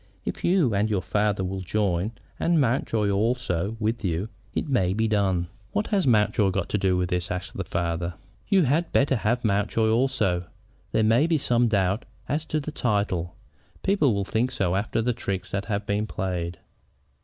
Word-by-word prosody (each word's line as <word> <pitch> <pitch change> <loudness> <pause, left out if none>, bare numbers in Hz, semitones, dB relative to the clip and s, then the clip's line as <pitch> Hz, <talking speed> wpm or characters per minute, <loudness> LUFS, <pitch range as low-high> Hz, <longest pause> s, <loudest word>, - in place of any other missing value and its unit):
If - - -4
you 170 - +3
and 105 +2 +1
your 100 -4 0
father 105 -2 +1
will 95 +1 -3
join, 95 +1 0 0.3
and 170 -1 +3
Mountjoy 115 -5 +1
also 105 -2 0
with 115 +2 -1
you, 90 +3 -1 0.3
it - - -1
may 95 -10 +2
be 110 +2 +1
done." 95 -5 +1 0.3
"What 210 - +1
has 195 -7 +1
Mountjoy 105 -3 +3
got 95 -1 -2
to 105 - 0
do 95 -1 +2
with 90 0 -1
it?" 90 0 -1
asked 90 -1 -4
the - - -2
father. 85 0 -2 0.3
"You 195 -3 +4
had 160 +5 +1
better 135 -1 +3
have 120 +2 0
Mountjoy 105 +2 +2
also. 115 -8 +1 0.5
There 110 - +2
may 115 +8 +4
be 165 -2 +2
some 120 -3 +2
doubt 100 -1 +1 0.2
as 150 +3 -1
to 155 - -1
the 150 +1 -5
title. 100 - -1 0.5
People 190 -9 +3
will 100 -1 -1
think 115 +5 0
so 95 -6 0
after 105 +3 0
the 125 +1 +1
tricks 100 -4 -4
that 100 0 -2
have 105 -1 -2
been 105 +1 0
played." 90 -4 -3
105 Hz, 185 wpm, -25 LUFS, 95-120 Hz, 0.5 s, You